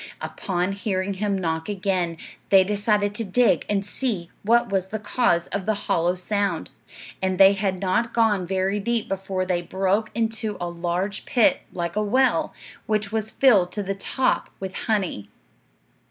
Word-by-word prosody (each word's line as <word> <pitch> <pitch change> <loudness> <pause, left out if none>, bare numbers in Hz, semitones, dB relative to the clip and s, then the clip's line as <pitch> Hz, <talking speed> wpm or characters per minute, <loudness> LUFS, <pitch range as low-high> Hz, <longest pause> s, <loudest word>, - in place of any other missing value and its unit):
Upon 180 0 -2
hearing 200 -1 -2
him 200 0 -1
knock 160 -1 -2
again, 185 -4 -1 0.3
they 195 -1 +7
decided 205 +1 +1
to 225 - -3
dig 230 +4 +2
and 200 -1 0
see 205 -7 -3
what 235 +2 +3
was 190 -1 0
the 220 - -4
cause 210 -4 +1
of 200 -1 -3
the 215 - +2
hollow 175 +2 +1
sound; 195 -2 -2 0.5
and 190 -1 0
they 195 +1 +8
had 195 -2 -1
not 200 +5 0
gone 210 -6 +2
very 190 +2 0
deep 230 +2 -1
before 190 -1 -2
they 180 -1 0
broke 195 +4 0
into 225 -1 -1
a 175 - -2
large 175 +4 -3
pit, 270 +3 +3
like 170 0 -4
a 210 - +1
well, 255 +6 +2 0.4
which 210 -2 0
was 220 -1 -2
filled 210 -9 +4
to 205 - -2
the 195 0 -2
top 255 +6 -1
with 190 -1 -5
honey. 190 - -2
195 Hz, 165 wpm, -24 LUFS, 185-215 Hz, 0.5 s, they